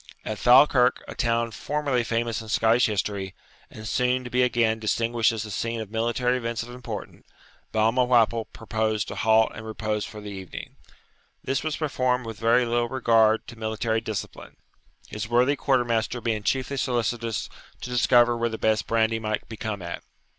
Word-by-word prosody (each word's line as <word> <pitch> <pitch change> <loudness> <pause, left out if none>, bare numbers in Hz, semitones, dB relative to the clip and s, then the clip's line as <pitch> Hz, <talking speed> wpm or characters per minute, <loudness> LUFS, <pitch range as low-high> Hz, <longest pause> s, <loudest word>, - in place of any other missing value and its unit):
At 110 -1 -4
Falkirk, 125 0 +5
a - - -7
town 115 0 0
formerly 140 0 -1
famous 115 -1 -1
in 110 - -10
Scottish 115 +2 +3
history, 100 -2 -3 0.3
and 110 0 -9
soon 125 +3 +1
to 120 - -8
be 125 - +2
again 115 -3 +2
distinguished 115 +1 +1
as 110 -2 -4
the 105 - -7
scene 115 +3 -2
of 110 -2 -7
military 120 +2 0
events 115 -2 -3
of 120 - -10
importance, 120 -4 -8 0.5
Balmawhapple 115 0 +3
proposed 110 -1 -2
to - - -6
halt 110 0 +3
and 110 - -8
repose 110 -1 -3
for 105 - -8
the 105 -1 -8
evening. 95 -3 -8 0.7
This 135 +1 -1
was 155 -1 -2
performed 130 -5 0
with 115 -1 -7
very 115 +2 +3
little 120 0 0
regard 115 -3 +3
to 120 -2 -12
military 110 +1 -1
discipline, 110 -3 -6 0.5
his 105 +1 -5
worthy 125 +4 +3
quarter 130 -3 +1
master 115 +1 -1
being 115 -2 -1
chiefly 135 +5 -1
solicitous 120 -3 -1 0.3
to 125 - -6
discover 120 -1 +4
where 115 0 0
the 110 - -5
best 110 -1 +1
brandy 115 0 +1
might 110 -1 -3
be 115 - -8
come 105 -3 -4
at. 85 0 -6
115 Hz, 175 wpm, -25 LUFS, 110-125 Hz, 0.7 s, Falkirk